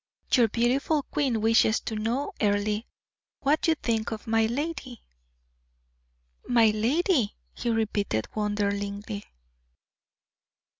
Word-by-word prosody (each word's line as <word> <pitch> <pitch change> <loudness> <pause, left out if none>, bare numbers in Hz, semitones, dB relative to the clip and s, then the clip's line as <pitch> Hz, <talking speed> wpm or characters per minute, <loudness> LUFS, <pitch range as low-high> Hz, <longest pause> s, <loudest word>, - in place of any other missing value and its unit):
"Your 240 -4 +5
beautiful 255 +7 +1
queen 260 -7 -1
wishes 225 0 +4
to - - -5
know, 235 - -1
Earle, 210 0 +1 0.6
what 300 +5 +2
you 325 - +4
think 225 -6 -1
of 220 -1 -6
my 225 -1 +2
lady?" 260 -1 -4 1.4
"My 230 -3 +5
lady!" 250 - +1 0.2
he 240 - -3
repeated 210 - 0
wonderingly. 205 0 -2
225 Hz, 100 wpm, -27 LUFS, 210-255 Hz, 1.4 s, Your